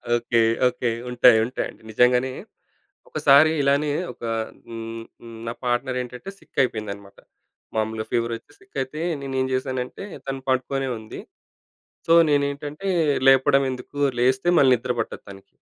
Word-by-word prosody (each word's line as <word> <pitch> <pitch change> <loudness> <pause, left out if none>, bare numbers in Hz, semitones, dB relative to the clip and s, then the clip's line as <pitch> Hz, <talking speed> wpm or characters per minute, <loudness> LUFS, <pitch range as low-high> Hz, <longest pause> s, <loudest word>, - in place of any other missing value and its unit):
Okay. 120 -1 +1 0.3
Okay. 125 -1 -1 0.2
ఉంటాయి. 125 -1 +6
ఉంటాయండి 125 - -5
నిజంగానే 125 +3 +3 0.8
ఒకసారి 145 +3 +5
ఇలానే 140 +2 +2 0.2
ఒక - - -22 0.6
న్ 115 0 -6 0.4
నా - - -2
పార్ట్నర్ 125 +1 0
ఏంటంటే, 125 +7 -10
సిక్ - - -19
అయిపోయిందనమాట. 100 -4 -5 0.6
మామూలుగా 110 0 -2
ఫీవర్ 115 0 0
వచ్చి 130 - -17
సిక్ 195 -5 -21
అయితే 140 +4 -7 0.2
నేనేం 130 -1 -1
చేశానంటే, 130 +5 -3 0.2
తను 135 0 -3
పడుకొనే 135 +1 0
ఉంది. 110 0 -9 0.9
సో, 165 - +5 0.2
నేనేంటంటే 145 +5 -1 0.4
లేపడం 135 +1 +5
ఎందుకు 130 +3 -9 0.2
లేస్తే 130 +6 +2
మళ్ళీ 130 -2 +6
నిద్ర 125 +1 -2
పట్టదు 115 - -4
తనకి 100 0 -14
130 Hz, 125 wpm, -23 LUFS, 120-140 Hz, 0.9 s, ఉంటాయి